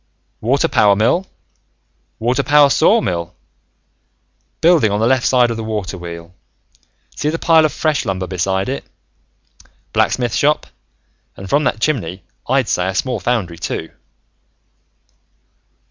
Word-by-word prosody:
"Water 130 +5 +1
power 100 -1 +3
mill, 125 - +1 0.9
water 125 +4 0
power 145 0 +4
sawmill 90 - +1 1.2
building 165 -9 +4
on 105 - 0
the 110 - +2
left 130 +1 +2
side 125 -2 +3
of 115 - -4
the 115 - -4
water 105 -3 -4
wheel, 85 -1 -9 0.8
see 150 - -1
the 165 - -2
pile 165 -1 +4
of 155 - 0
fresh 155 -2 -1
lumber 95 -1 -3
beside 95 +1 -1
it. 135 +2 -4 1.1
Blacksmith 120 -3 +1
shop, 150 +2 +1 0.7
and 95 - -8
from 145 +8 +1
that - - 0
chimney, 100 - -2 0.3
I'd 130 -2 +2
say 90 +1 0
a 95 - -3
small 125 +4 -1
foundry, 100 -9 -2
too. 80 - -4
115 Hz, 130 wpm, -17 LUFS, 95-140 Hz, 1.2 s, power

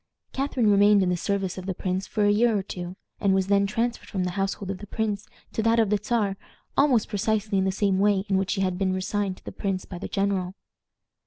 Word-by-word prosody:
Catharine 260 -5 +1
remained 205 0 +5
in 180 - +1
the 180 - +2
service 190 +1 -2
of 185 - -8
the 190 - -2
prince 185 +1 -2
for 210 -2 0
a 205 - +5
year 225 +1 +3
or 195 - -2
two, 180 -1 -6 0.2
and 195 -2 +3
was 190 -1 +2
then 200 0 +4
transferred 230 +3 -2
from 190 -3 -1
the 180 - -1
household 195 +1 -2
of 190 - -6
the 205 - -9
prince 210 -1 -2 0.3
to - - 0
that 230 +1 +3
of 220 -3 +2
the 210 - +3
Czar 210 -4 0 0.4
almost 270 -6 +3
precisely 210 -1 0
in 190 - +1
the 190 - +2
same 190 0 +1
way 200 -1 +3
in 195 - +1
which 190 0 -2
she 195 - 0
had 185 -1 0
been 190 -1 +1
resigned 190 0 -2
to - - -21
the - - -5
prince 195 -2 -3
by 180 - -8
the - - -5
general. 195 -2 -1
200 Hz, 245 wpm, -26 LUFS, 190-210 Hz, 0.4 s, remained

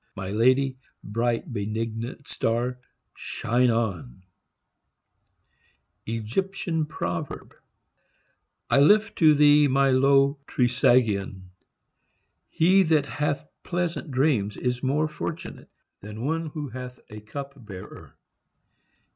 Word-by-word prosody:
My 95 0 -5
lady, 130 +4 +2 0.2
bright 115 +3 -2
benignant 115 +5 -4
star, 120 +2 -1 0.3
shine 125 +2 0
on 95 - -2 1.9
I 115 - -1 2.6
lift 210 +9 +4
to 155 -2 +6
thee 145 0 +6
my 135 0 +3
low 140 +2 +4
Trisagion! 115 -7 +1 1.0
HE 185 +4 +4
that 160 -5 +2
hath 150 0 -2
pleasant 175 -2 -3
dreams 130 -7 +1
is 125 -1 -2
more 145 +4 +1
fortunate 155 +2 -7 0.3
than 105 +4 -7
one 165 +2 -1
who 150 -2 -6
hath 125 +1 -8
a 105 - -8
cup 140 +4 -8
bearer. 95 -4 -11
130 Hz, 90 wpm, -25 LUFS, 115-145 Hz, 2.6 s, to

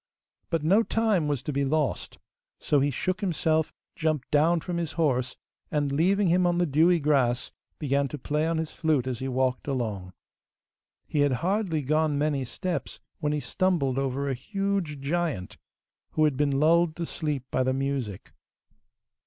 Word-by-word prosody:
But 165 -2 -1
no 195 +8 +5
time 220 -8 +1
was 145 -4 -1
to 150 - -3
be 140 +1 +1
lost, 145 0 -1 0.4
so 145 - +1
he 140 +1 +2
shook 185 +7 -2
himself, 160 -4 +1 0.2
jumped 155 -4 -1
down 160 +4 +4
from 175 +1 -4
his 165 -3 -3
horse, 130 -6 0 0.3
and, 145 -2 0
leaving 190 +8 +2
him 180 +1 +3
on 175 0 +1
the 175 - +3
dewy 165 +4 +4
grass, 135 -4 +1 0.3
began 140 -1 0
to 150 - -6
play 150 +4 -1
on 165 0 0
his 160 -1 -2
flute 155 -6 +1
as 125 -3 -3
he 130 - -3
walked 130 0 0
along. 105 -9 -3 0.9
He 150 - -2
had 145 -2 +3
hardly 185 -6 0
gone 155 +1 +1
many 145 -2 0
steps 180 +7 -4 0.2
when 150 -2 0
he 150 - 0
stumbled 150 -7 0
over 135 +1 -1
a 135 - 0
huge 195 - -2
giant, 150 - -2 0.6
who 155 - +2
had 150 -3 +3
been 145 +1 +1
lulled 165 +1 +4
to 170 - -3
sleep 150 -5 -3
by - - +1
the 130 0 +2
music. 135 -7 -3
150 Hz, 170 wpm, -27 LUFS, 135-170 Hz, 0.9 s, no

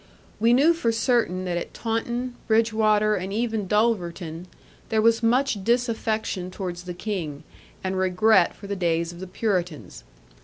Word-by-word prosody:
We 230 +2 +4
knew 290 +7 +5
for 245 -9 0
certain 225 -6 +1
that 175 -1 -1
at - - -8
Taunton, 240 +2 -2
Bridgwater, 220 -1 +3
and 185 +2 -4
even 220 -2 -1
Dulverton, 180 -6 -1 0.4
there 220 - +1
was 225 +1 +4
much 235 -3 +1
disaffection 220 -5 0
towards 180 -2 -6
the 180 -1 -6
King, 175 -8 -4 0.4
and 190 0 -2
regret 185 +1 +3
for 205 - -12
the 200 0 -3
days 170 -2 0
of 175 - -12
the 190 - -6
Puritans. 180 -6 -3
210 Hz, 150 wpm, -24 LUFS, 180-230 Hz, 0.4 s, knew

